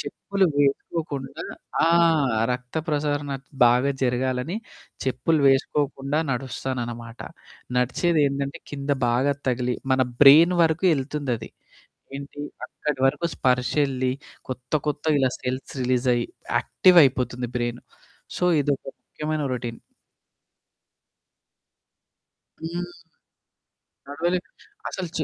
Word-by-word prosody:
చెప్పులు 195 -2 -1
వేసుకోకుండా 145 0 -1 0.4
ఆ! - - +5 0.6
రక్త 125 +4 -6
ప్రసరణ 145 -1 -1 0.3
బాగా 125 +3 +4
జరగాలని 130 - 0 0.5
చెప్పులు 135 +5 +1
వేసుకోకుండా 140 +1 +1
నడుస్తానన్నమాట. 120 -2 -5 0.6
నడిచేదేందంటే 140 +1 +1
కింద 140 0 -4 0.2
బాగా 130 +4 +2 0.2
తగిలి 125 0 0 0.2
మన 130 - +3 0.2
బ్రెయిన్ 160 +6 +8
వరకు 160 +3 +1
యెళ్తుందది. 135 -5 -3 0.7
ఏంటి 140 +1 -8 0.2
అక్కడి 150 -3 -4
వరకు 145 +5 -1
స్పర్శ 125 -1 +1
ఎళ్ళి 130 -1 -1 0.4
కొత్త 125 +2 -7
కొత్త 150 +1 -2
ఇలా 130 - +3
సెల్స్ 130 +1 -4
రిలీజ్ 125 0 +1
అయ్యి 120 - -1 0.3
యాక్టివ్ 180 -2 +5
అయిపోతుంది 125 -2 0
బ్రెయిన్. 120 0 -3 0.6
సో - - -2 0.2
ఇదొక 140 -1 -1 0.2
ముఖ్యమైన 155 0 -4
రొటీన్. 120 -2 -5 2.8
హ్మ్. 175 +2 -3 1.2
నడవలేరు. 175 +5 -2 0.4
అసలు 185 -2 -4
చె 155 - 0
135 Hz, 95 wpm, -24 LUFS, 125-150 Hz, 2.8 s, బ్రెయిన్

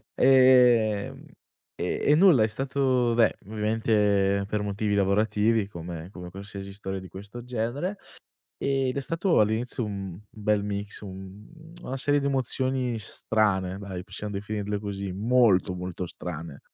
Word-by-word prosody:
Ehm, 125 -5 +4 0.5
e - - -2
e 145 - +5
nulla, 165 - +6
è - - +3
stato 130 0 0
beh 115 -2 +3
ovviamente 105 -2 +1
per 105 0 -1
motivi 105 +1 -1
lavorativi, 105 +2 +2
come 85 -2 -7
come 90 -2 -9
qualsiasi 100 +1 -8
storia 95 -1 -5
di 95 - -10
questo 100 +6 -9
genere, 125 - -3 0.6
ed 135 -2 0
è - - 0
stato 165 +5 +1
all'inizio 110 +3 +1
un 100 -3 -5 0.2
un 105 - -12
bel 105 -1 +2
mix, 100 0 -4
un 95 +1 -10 0.3
una 135 -3 -5
serie 145 +2 +2
di 140 - -1
emozioni 130 -2 0
strane 95 -2 0
dai, 95 -3 -6
possiamo 105 +2 -6
definirle 105 0 -3
così, 100 -2 -4
molto, 105 -2 +3
molto 90 0 -5
strane. 85 -4 -7
105 Hz, 140 wpm, -26 LUFS, 100-125 Hz, 0.6 s, nulla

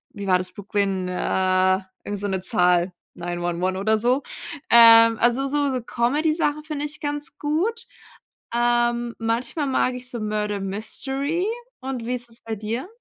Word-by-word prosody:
wie 200 -1 -6
war 185 -1 +5
das 185 - -5
Brooklyn, 200 -2 -1
äh, 185 +1 +2 0.2
irgend 205 -1 -4
so 205 - -2
'ne 190 -2 -1
Zahl, 180 0 +2 0.2
Nine-One-One 175 +1 -2
oder 220 +2 +2
so. 250 +5 +1 0.5
Ähm, 230 -1 +8
also, 245 +3 +3
so 280 -2 0
Comedy-Sachen 295 +6 0
finde 300 -1 -4
ich 300 +1 -8
ganz 290 0 -4
gut. 385 +11 -1 0.7
Ähm, 240 0 +1
manchmal 235 +6 -1
mag 255 -1 +1
ich 250 0 -7
so 240 - -5
Murder 210 -1 -2
Mystery 270 - -2 0.4
und 260 -3 -4
wie 250 - 0
ist 240 -1 -8
es 230 - -13
bei 225 -1 -4
dir? 220 - -4
235 Hz, 150 wpm, -23 LUFS, 200-270 Hz, 0.7 s, Ähm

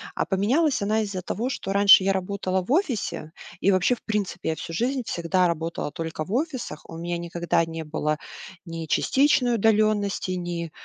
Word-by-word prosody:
А - - 0
поменялась 255 - +1
она 215 +2 +1
из-за 200 -3 -3
того, 225 +7 -3
что 195 -6 -3
раньше 200 -1 +7
я 195 - +2
работала 190 0 -1
в 215 - -6
офисе. 260 - -1 0.3
И 200 - +3
вообще, 185 +6 +3
в - - -21
принципе, 210 -6 -2
я 160 - 0
всю 165 - -7
жизнь 250 +7 0
всегда 180 +2 +1
работала 165 -2 -3
только 160 0 -4
в 190 - -6
офисах. 255 - -2
У 165 - -8
меня 170 +1 -3
никогда 170 0 0
не 165 0 -6
было 155 0 -1 0.5
ни 165 -1 -5
частичной 265 - +3
удалённости, 215 -3 +2
ни 175 -2 -4
190 Hz, 175 wpm, -25 LUFS, 170-220 Hz, 0.5 s, раньше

